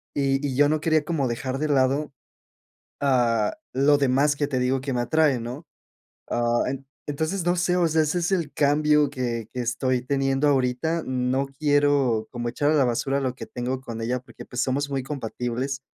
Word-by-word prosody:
y 135 0 +1
y, 130 - -3
yo 145 +1 +5
no 155 0 0
quería 155 -2 +2
como 150 -6 0
dejar 130 +3 -3
de 155 - 0
lado, 140 +2 +2 0.9
ah, 120 - +2 0.2
lo 145 +2 +4
demás 140 +2 +3
que 145 0 -1
te 130 -3 -1
digo 130 +1 +1
que 135 0 -3
me 120 - 0
atrae, 150 -3 +2
¿no? 125 +7 -7 0.6
Ah, 120 0 +1
en 135 0 -5 0.2
entonces, 160 +5 -2
no 175 +1 +2
sé, 180 0 +1
o 175 -2 +3
sea, 160 0 +2
ese 155 +4 0
es 170 - -1
el 165 -6 0
cambio 150 0 +3
que 120 -3 -3
que 125 - -4
estoy 125 +1 0
teniendo 135 +1 0
ahorita. 135 +5 +1
No 130 +1 0
quiero 145 -6 +2
como 120 -1 -4
echar 145 +5 +1
a - - +2
la 140 -3 +4
basura 135 +3 0
lo 130 -2 -2
que - - -7
tengo 125 +2 -3
con 115 -2 -6
ella, 125 +2 -1
porque, 125 -3 -13
pues, 125 0 -2
somos 140 +2 0
muy 135 -1 -1
compatibles 130 0 -4
135 Hz, 195 wpm, -24 LUFS, 125-150 Hz, 0.9 s, yo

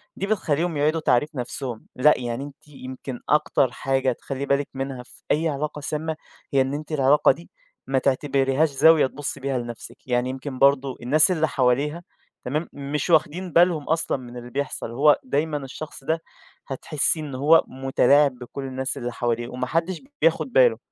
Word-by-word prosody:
دي 195 - -3
بتخلّيهم 170 -5 0
يعيدوا 155 +3 +2
تعريف 140 0 +2
نفسُهم، 125 -1 -5
لأ، 150 +4 +5
يعني 120 +1 -3
أنتِ 145 +1 -12
يمكن 130 -2 -8
أكتر 140 -4 +2
حاجة 135 0 0
تخلي 135 +3 -5
بالك 140 0 +1
منها 135 -1 -5
في - - -19
أي 160 +2 +2
علاقة 150 +1 -3
سامة، 155 +2 -3 0.4
هي 135 - +4
إن 135 +1 -1
أنتِ 150 +2 -6
العلاقة 145 0 +4
دي 165 +6 -8 0.4
ما 135 -1 +2
تعتبريهاش 135 +2 +1
زاوية 150 +1 +5
تبُصّي 145 +2 -6
بيها 135 -1 -2
لنفسِك، 120 0 -8
يعني 125 0 +1
يمكن 130 0 -6
برضه 140 -1 +3
الناس 150 +8 +4
اللي 160 -3 +1
حواليها، 140 +5 0 0.4
تمام؟ 150 +6 -2
مش 145 +4 -3
واخدين 170 +3 +2
بالهم 170 -3 +4
أصلًا 160 -2 +1
من 125 -1 -10
اللي 120 0 -8
بيحصل، 140 -4 -3
هو 145 +5 +4
دايمًا 155 - -1
الشخص 140 +1 -8
ده 160 +3 0 0.5
هتحسيه 150 +3 -1
إن 140 -4 -6
هو 150 +5 +5
متلاعب 135 +2 +3
بكل 130 +2 -7
الناس 130 0 -3
اللي 120 0 -4
حواليه، 120 -1 -2
وما 125 0 -4
حدش 165 +4 -1 0.2
بياخد 165 +10 +2
باله، - - +5
140 Hz, 170 wpm, -24 LUFS, 130-155 Hz, 0.5 s, لأ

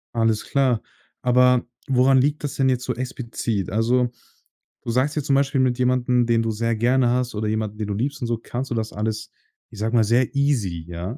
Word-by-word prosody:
Alles 115 -1 +1
klar. 130 -5 +1 0.4
Aber 125 0 +4 0.2
woran 130 0 +4
liegt 145 +3 0
das 145 - -3
denn 135 -1 +2
jetzt 125 -1 0
so - - -1
explizit? 120 -5 -3
Also, 120 +3 +1 0.7
du 115 - -3
sagst 130 +5 +1
ja 150 - -1
zum 140 -1 +2
Beispiel 135 -1 +2
mit 125 -2 +1
jemandem, 125 -1 +2
den 115 -1 +2
du 115 0 -1
sehr 115 +2 -1
gerne 120 +2 +2
hast 125 -1 -1
oder 105 +1 -2
jemanden, 110 -1 -2
den 105 -1 -3
du 100 - -2
liebst 135 +7 -3
und 120 - -2
so, 115 -1 -1
kannst 125 +3 -5
du - - 0
das 110 -1 -3
alles, 110 +1 -3 0.4
ich 105 - -12
sage 110 +3 -1
mal, 115 - +5
sehr 120 +4 +2
easy, 110 - 0
ja? 90 - -5
120 Hz, 215 wpm, -23 LUFS, 110-130 Hz, 0.7 s, mal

